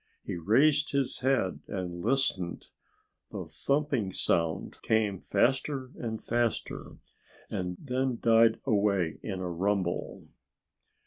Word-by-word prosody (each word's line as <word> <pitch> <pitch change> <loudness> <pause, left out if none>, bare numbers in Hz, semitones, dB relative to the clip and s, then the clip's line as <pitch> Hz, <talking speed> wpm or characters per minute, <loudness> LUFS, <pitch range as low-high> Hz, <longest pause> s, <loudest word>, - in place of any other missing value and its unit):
He - - -4
raised 140 - +3
his 140 -2 0
head 130 -8 +1
and 90 -2 -4
listened. 115 -8 0 0.6
The - - -5
thumping 140 -8 0
sound 85 -3 0
came 105 -4 +1
faster 130 +3 0
and 110 -2 -4
faster, 120 -1 -2 0.5
then 125 +7 -2
died 115 -1 +5
away 100 -8 +1
in 95 -3 -4
a 90 - -2
rumble. 95 0 -1
110 Hz, 105 wpm, -29 LUFS, 95-130 Hz, 0.6 s, died